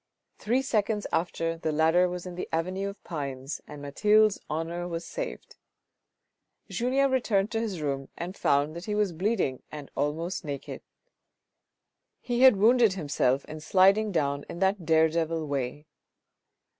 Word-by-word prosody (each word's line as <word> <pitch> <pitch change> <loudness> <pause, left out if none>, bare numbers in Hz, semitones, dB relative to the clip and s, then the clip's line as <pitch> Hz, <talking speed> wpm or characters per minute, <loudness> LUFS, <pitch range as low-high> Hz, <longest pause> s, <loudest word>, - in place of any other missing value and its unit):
Three 250 +5 +1
seconds 215 -4 0
after 165 -1 -1
the 160 - -1
ladder 160 +4 +3
was 180 0 -5
in 180 - -6
the 180 - -5
avenue 185 +4 -1
of 200 - -12
pines, 140 -4 -5
and 145 -1 -9
Mathilde's 210 +8 +3
honour 165 +3 -3
was 170 -1 -4
saved. - - -6 1.1
Julien 265 +3 +1
returned 215 -6 +1
to 225 - 0
his 200 -8 -3
room 135 -2 -2
and 180 +3 -5
found 145 0 +1
that 170 +2 -7
he 210 - -2
was 210 -4 +1
bleeding 185 - -1
and 150 -2 -8
almost 165 +6 -2
naked. 140 -3 -6 1.4
He 245 0 -2
had 260 -4 +8
wounded 225 +1 +5
himself 140 -6 0
in 155 0 -8
sliding 195 +6 +4
down 140 -4 0
in - - -6
that 190 -2 0
dare 160 0 +5
devil 165 0 -1
way. 140 +1 -3
175 Hz, 150 wpm, -28 LUFS, 150-210 Hz, 1.4 s, had